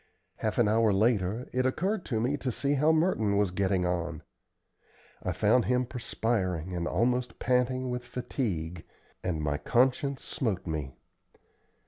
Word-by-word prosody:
Half 110 -1 -2
an 120 - +4
hour 110 0 +4
later 105 +2 +1
it 130 0 +2
occurred 185 +10 0
to 115 -5 -1
me 125 +6 +1
to 130 -2 -2
see 140 +5 0
how 150 +3 +4
Merton 155 - +2
was 100 -3 +2
getting 95 -1 +1
on. 85 -2 -2 1.0
I - - -2
found 125 -3 +3
him 125 0 +2
perspiring, 95 - -2
and 85 0 -1
almost 125 +2 0
panting 125 +1 +1
with 125 0 -3
fatigue, 105 - -3 0.4
and 80 -4 -1
my 75 0 -1
conscience 130 - +1
smote 105 -8 -2
me. 75 -5 -4
115 Hz, 145 wpm, -29 LUFS, 90-125 Hz, 1.0 s, an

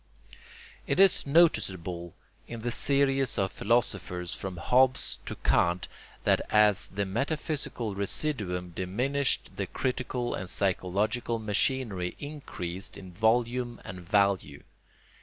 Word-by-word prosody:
It - - 0
is 195 -6 +5
noticeable 95 - +2 0.3
in 115 -1 -7
the 120 +1 -2
series 135 0 +1
of 95 -1 0
philosophers 95 -6 0
from 95 -2 -5
Hobbes 130 +8 +2
to - - -4
Kant 85 +1 +1 0.4
that - - +3
as 105 -2 +4
the 100 +1 -2
metaphysical 135 0 -2
residuum 100 - +1
diminished 125 +11 -1
the - - -2
critical 125 -1 -2
and 95 - -5
psychological 100 +5 0
machinery 105 -3 -1
increased 100 - -6
in 95 -1 -10
volume 120 +4 +1
and 90 - -7
value. 95 -5 +1
105 Hz, 110 wpm, -28 LUFS, 95-130 Hz, 0.4 s, is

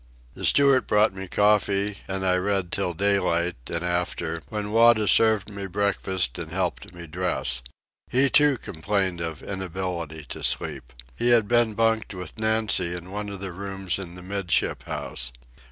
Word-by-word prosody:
The - - -5
steward 140 -2 +4
brought 105 0 +3
me 95 0 -7
coffee, 100 0 +2
and 95 0 -2
I 90 -1 +3
read 95 -2 -1
till 90 -3 0
daylight 90 -3 +1
and 85 +1 -3
after, 85 -2 -2
when 105 -1 -4
Wada 115 -1 +5
served 110 -2 +4
me 100 -2 -6
breakfast 95 -2 -1
and 80 -2 -6
helped 90 -1 -2
me 85 0 -8
dress. 85 -6 -1 0.5
He, 130 +3 +4
too, 145 -1 +4
complained 95 -1 -2
of 80 -2 -5
inability 90 -4 -4
to - - -6
sleep. - - 0 0.2
He 120 - +1
had 115 -3 +5
been 120 -2 +2
bunked 115 -2 +1
with 90 +4 -7
Nancy 110 -5 +1
in 90 +1 -8
one 105 0 -4
of 100 -1 -7
the 95 -2 -4
rooms 95 0 -4
in 90 -2 -8
the 90 - -10
'midship 100 -1 -1
house. 65 0 -3
95 Hz, 165 wpm, -25 LUFS, 90-105 Hz, 0.5 s, Wada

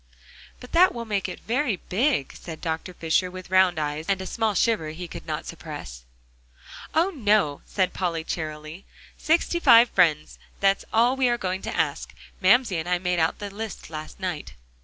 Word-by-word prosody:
"But 250 - -12
that 360 -1 +5
will 235 -1 -4
make 205 -3 -1
it - - -8
very 245 -1 0
big," 205 - 0
said 160 -2 -9
Dr. 165 +2 -3
Fisher, 170 +1 0
with 185 0 -10
round 185 -2 +4
eyes 150 +1 -3
and 195 -1 +2
a 190 - -5
small 220 0 -1
shiver 210 -6 +1
he 170 +3 -7
could - - -9
not - - -3
suppress. - - -8 0.9
"Oh, 340 +5 +3
no!" 210 - +1
said 185 -2 0
Polly 170 -3 -2
cheerily, 155 +2 -6 0.3
"sixty 340 +2 +1
five 235 -6 +7
friends; 155 -5 +2 0.2
that's 195 0 +2
all 240 +3 +3
we 260 -2 +2
are 240 - +1
going 185 -3 -3
to - - -5
ask; - - -1 0.3
Mamsie 200 0 +4
and 165 +2 -4
I 180 - +2
made 180 0 -1
out 160 +1 +1
the 205 -1 -6
list 210 -4 -7
last 155 +3 -8
night." 180 -5 -4
185 Hz, 180 wpm, -25 LUFS, 160-230 Hz, 0.9 s, five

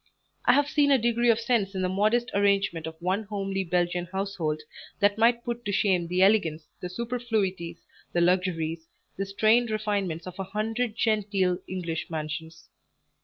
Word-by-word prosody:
I 245 - +6
have 285 +2 +3
seen 290 -1 +3
a 275 - +6
degree 235 0 +2
of 230 -1 +4
sense 225 -4 0
in 185 - -1
the - - +2
modest 215 +6 +1
arrangement 200 -5 +1
of 160 0 -9
one 185 +4 0
homely 195 -2 -2
Belgian 175 0 0
household, 190 -5 -2 0.4
that 205 0 +3
might 235 +1 +4
put 240 0 -4
to 205 - -1
shame 185 -4 +2
the 180 +2 +2
elegance, 170 -7 +3
the 180 - -5
superfluities, 200 -6 -2 0.3
the 175 - +1
luxuries, 170 -3 0 0.3
the 195 +1 -3
strained 220 +4 +3
refinements 205 -6 -2
of 185 +1 -9
a - - -1
hundred 215 +4 -2
genteel 200 -5 +1
English 170 -3 -4
mansions. 160 0 -5
195 Hz, 165 wpm, -27 LUFS, 175-220 Hz, 0.4 s, I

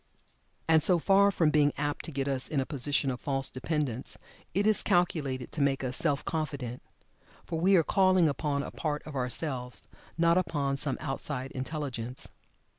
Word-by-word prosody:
And 160 -1 +5
so 180 +3 +5
far 195 +4 +4
from 165 -6 +2
being 145 -1 +3
apt 145 0 -2
to - - -5
get 135 -1 -2
us 135 -2 -1
in 150 - -1
a 135 - 0
position 140 0 0
of 125 - -5
false 135 -1 0
dependence, 130 -2 -2 0.4
it 200 +2 +2
is 215 -2 +4
calculated 140 -8 0
to 155 - -2
make 135 -1 +1
us 130 0 0
self 145 -2 +2
confident 140 -6 -3 0.6
for 165 -2 -3
we 190 +4 +4
are 170 - +5
calling 185 -1 +4
upon 140 0 -1
a - - -6
part 150 -2 -3
of 155 - -9
ourselves, 125 -3 -3 0.3
not 170 +1 +4
upon 145 -6 -1
some 140 -1 0
outside 135 -2 -4
intelligence. 130 -3 -5
145 Hz, 175 wpm, -29 LUFS, 135-165 Hz, 0.6 s, And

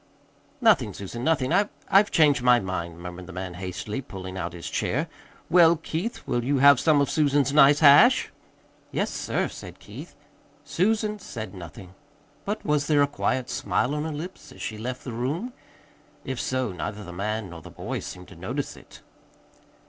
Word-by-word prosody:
"Nothing, 155 - +3
Susan, 110 +5 -6
nothing. 155 -2 +1
I 200 +3 +3 0.2
I've 205 +2 +5
changed 150 -5 +4
my 125 -1 +5
mind," 85 -4 -4
murmured 90 +1 -8
the - - -9
man 90 0 -5
hastily, 95 +6 -5
pulling 95 -6 -8
out 85 -2 -4
his 85 -1 -7
chair. - - -1 0.4
"Well, 170 -1 +6
Keith, 165 +7 -5
will 120 - -1
you 140 +3 +1
have 140 -1 +7
some 155 -3 +4
of 140 - +1
Susan's 145 -2 +2
nice 145 0 +6
hash?" 155 - +6 0.6
"Yes, - - -1
sir," - - -1
said - - -10
Keith. - - -11 0.5
Susan 210 +3 0
said 110 - -7
nothing. 90 0 -10 0.5
But 210 +2 -3
was 150 -1 +1
there 145 -2 +4
a - - +2
quiet 130 -3 -1
smile 140 - -1
on 150 +1 -2
her 160 - -3
lips 165 +6 -8
as - - -14
she 110 -1 -5
left 125 +3 -5
the 125 - -6
room? 150 - -3 0.7
If 130 -2 -3
so, 130 -4 -1
neither 100 +5 -5
the 90 -2 -9
man 105 +1 -3
nor 85 -1 -9
the - - -11
boy - - -5
seemed 90 0 -9
to - - -13
notice - - -4
it. - - -16
130 Hz, 180 wpm, -25 LUFS, 95-155 Hz, 0.7 s, have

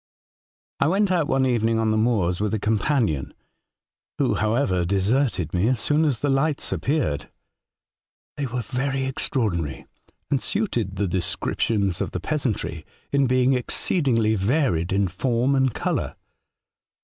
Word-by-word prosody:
" - - -81
I - - +3
went 195 +3 +2
out 170 -5 +2
one 135 -4 +2
evening 115 -3 +1
on 110 -1 +1
the - - +1
moors 110 -6 +1
with 105 +1 0
a - - -2
companion, 105 - 0 0.8
who, - - +2
however, 110 -5 +1
deserted 100 - 0
me 90 +4 +2
as 125 -2 +2
soon 150 +7 +2
as 135 -6 0
the 145 - +1
lights 140 +2 0
appeared. 105 - -1 1.1
They 145 -2 -2
were 125 0 -3
very 135 +4 -2
extra 130 -1 -1
ordinary, 85 - -2 0.5
and 140 -3 +2
suited 120 - -1
the 100 +1 0
descriptions 95 +2 -1
of - - -3
the - - -2
peasantry, 120 - -2 0.3
in 140 -1 +3
being 130 +1 +3
exceedingly 125 - +1
varied 105 - +1
in 100 0 +2
form 120 +8 0
and 135 -1 +2
colour. - - -2
120 Hz, 150 wpm, -24 LUFS, 100-135 Hz, 1.1 s, I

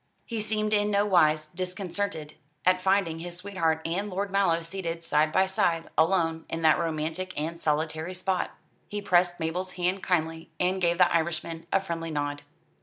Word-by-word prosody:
He 230 -2 -3
seemed 215 0 0
in 205 0 +3
no 205 0 +2
wise 155 -6 +4
disconcerted 180 -1 -4 0.3
at 185 0 +4
finding 190 -4 +2
his 175 +1 -6
sweetheart 175 -4 0
and 195 +5 -1
Lord 195 +1 -2
Mallow 185 -4 +2
seated 170 -1 -4
side 155 -1 +2
by 190 +4 +4
side, 170 -3 0
alone, 165 -1 +2
in 165 0 -3
that 160 +2 +5
romantic 165 +2 -2
and 165 +2 -3
solitary 160 +3 -1
spot. 185 0 0 0.4
He 205 - -4
pressed 175 -3 +2
Mabel's 180 +3 -2
hand 180 +2 0
kindly, 165 -2 -1
and 185 +1 +1
gave 170 -1 +2
the 180 -2 +4
Irishman 165 0 -2
a - - +4
friendly 170 -3 -4
nod. 145 -1 -2
175 Hz, 170 wpm, -27 LUFS, 160-190 Hz, 0.4 s, that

